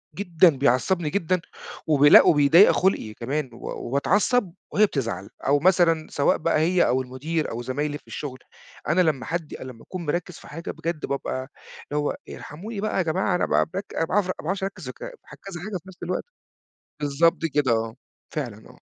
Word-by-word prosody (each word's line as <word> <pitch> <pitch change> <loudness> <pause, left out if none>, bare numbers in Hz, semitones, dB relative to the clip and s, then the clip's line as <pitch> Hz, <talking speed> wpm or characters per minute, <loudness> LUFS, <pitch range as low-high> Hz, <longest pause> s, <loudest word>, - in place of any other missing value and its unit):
جدًا، 175 -3 +4
بيعصّبني 145 +6 +2
جدًا. 180 +1 0 0.5
وبي 145 -2 +5
لأ - - +10
وبيضيّق 155 +6 +7
خُلقي 180 - +1
كمان 135 +5 -3
و - - -12 0.3
وباتعصّب 185 - +1 0.2
وهي 215 - +5
بتزعل 115 - -3 0.2
أو 145 +1 +4
مثلًا 170 -2 +3
سواء 140 - +2
بقى 165 -1 +1
هي 175 +3 +3
أو 130 +1 +2
المُدير 145 +6 -3
أو 115 - -4
زمايلي 145 +4 -2
في - - -27
الشغل، 130 -3 -6 0.5
أنا 160 +4 +3
لمّا 155 -7 +1
حد 165 -2 -4
لمّا 125 -3 -9
أكون 180 -2 -7
مركّز 175 +3 -2
في - - -14
حاجة، 165 +3 -6
بجد 165 -2 -4
بابقى 140 - -3 0.6
اللي 145 - -1
هو - - -1
ارحموني 200 +7 -7
بقى 215 - -1
يا - - +3
جماعة 175 +3 0
أنا - - +1
ب - - +1
بك 195 +2 -3
ما 165 - +2
باعرف 190 +3 +1
ما 185 - -1
باعرفش 190 +4 -2
أركّز 195 0 -5
وك - - -9
في - - -6 0.4
كذا 180 -3 -7
حاجة 200 -1 -3
في 180 - -17
نفس 185 - -13
الوقت. 180 +1 -2 0.7
بالضبط 150 +3 +2
كده 145 -5 +2
آه. 115 0 0 0.4
فعلًا 120 -8 -5
آه. - - -17
160 Hz, 185 wpm, -24 LUFS, 140-185 Hz, 0.7 s, لأ